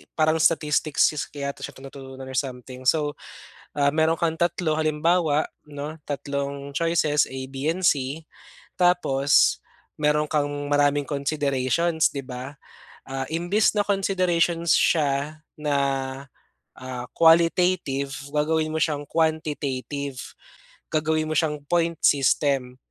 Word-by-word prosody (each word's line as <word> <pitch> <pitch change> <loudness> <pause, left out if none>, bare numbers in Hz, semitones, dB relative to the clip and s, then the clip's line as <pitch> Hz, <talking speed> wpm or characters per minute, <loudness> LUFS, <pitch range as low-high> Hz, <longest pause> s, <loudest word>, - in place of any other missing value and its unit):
parang 155 0 +2
statistics 155 -2 +2
skill 150 - -4
kaya 140 -1 -4
to - - -20
siya - - -7
tinuturo 135 0 -10
or 130 0 -8
something 130 -2 -7
so, 150 -1 +2 0.6
ah, 140 -1 +2
mayro'n 160 +2 +2
kang 165 -1 0
3 170 -2 0
halimbawa 155 0 +1 0.2
'no, 150 +1 -7
tatlong 140 0 -4
choices 165 -3 +2
A, 130 - -8
B, 140 +4 -1
and 185 - -6
C 140 +2 -2 0.6
tapos 145 -6 +3 0.4
mayron 150 0 +3
kang 150 -1 0 0.2
maraming 145 0 +3
considerations 145 +2 0
'di 140 -2 -6
ba? 130 +3 -8 0.5
Ah, 135 0 -3
imbis 175 +6 +2
na 210 - 0
considerations 180 -4 +1
siya 150 -1 +1 0.2
na, 150 -1 -1 1.0
ah, 130 -1 -7
qualitative 165 -4 +3 0.2
gagawin 155 +1 0
mo 160 - -1
siyang 150 -2 0
quantitative 145 -4 -2 0.8
gagawin 155 0 +1
mo - - -1
siyang 150 -2 0
point 170 +1 +1
system. 135 -2 +2
150 Hz, 120 wpm, -24 LUFS, 140-160 Hz, 1.0 s, tapos